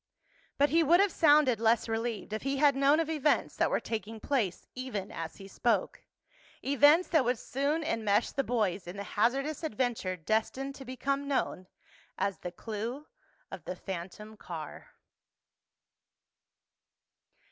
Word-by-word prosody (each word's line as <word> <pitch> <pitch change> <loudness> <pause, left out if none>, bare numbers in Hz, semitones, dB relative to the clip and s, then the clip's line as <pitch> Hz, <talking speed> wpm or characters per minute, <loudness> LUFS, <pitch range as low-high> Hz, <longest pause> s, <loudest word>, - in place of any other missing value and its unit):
But 285 +1 +3
he 330 +2 +5
would 335 +3 +5
have 400 -1 +4
sounded 290 - +4
less 225 +1 +3
relieved 225 -2 -3
if 215 - -2
he 275 +1 -1
had 285 -1 +4
known 280 +3 +4
of 325 - 0
events 305 -2 +1
that - - +2
were - - +1
taking 220 0 -5
place 220 -9 -1
even 245 -7 -5
as 165 -1 -6
he 195 - -11
spoke—events 285 - +1
that 315 -5 +4
would 245 0 +1
soon 285 +7 -1
enmesh 220 -7 +1
the 275 - 0
boys 205 -7 -1
in 180 +3 -7
the 200 - -4
hazardous 270 +9 0
adventure 230 -8 -1
destined 220 - -1
to 270 -1 -10
become 275 +2 -2
known 260 -9 -1 0.5
as 200 -1 -1
The 180 - -6
Clue 225 +9 -5 0.5
of 190 -5 -8
the 180 - -4
Phantom 190 +4 -7
Car. 160 -6 -8
240 Hz, 145 wpm, -30 LUFS, 205-280 Hz, 0.5 s, he